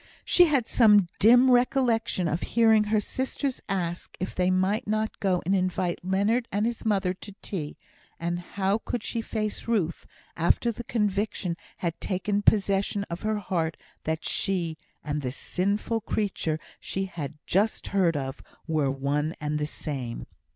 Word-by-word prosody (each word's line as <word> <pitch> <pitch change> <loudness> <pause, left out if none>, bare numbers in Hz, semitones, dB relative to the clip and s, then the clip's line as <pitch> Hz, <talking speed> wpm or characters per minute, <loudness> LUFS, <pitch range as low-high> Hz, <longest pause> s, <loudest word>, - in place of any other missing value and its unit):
She 355 - +6
had 280 -7 +2
some 210 -5 +6
dim 245 +5 +7
recollection 245 -6 +2
of 160 +2 -1
hearing 220 -2 +4
her 215 0 +2
sisters 260 +4 -3
ask 175 -3 -3
if 185 - -3
they 180 0 +1
might 185 +3 +1
not 215 +1 -1
go 185 -3 +1
and 190 - +2
invite 185 -1 0
Leonard 205 +6 +1
and 205 +2 +1
his 235 0 -2
mother 195 -4 +1
to 195 +1 -11
tea; 155 -7 -4 0.4
and 170 +1 -1
how 195 +3 -1
could 235 -1 -4
she 230 - -2
face 215 -1 -3
Ruth, 195 -8 0 0.3
after 170 +8 +2
the 235 +2 -7
conviction 205 -5 -1 0.2
had 170 -2 -3
taken 200 +2 0
possession 200 -1 +2
of 170 - -4
her 215 0 0
heart 170 -5 -1 0.3
that 160 +1 -2
she, 175 -4 0 0.3
and 150 -1 -2
the 130 - -2
sinful 200 - -1
creature 195 -7 -1 0.2
she 195 0 -3
had 155 -5 -6
just 205 +4 +1
heard 180 -6 +2
of, 135 -1 -4 0.2
were 155 -4 +1
one 140 +3 -1
and 150 0 -1
the 150 - -1
same? 130 -6 -5
195 Hz, 160 wpm, -27 LUFS, 170-215 Hz, 0.4 s, dim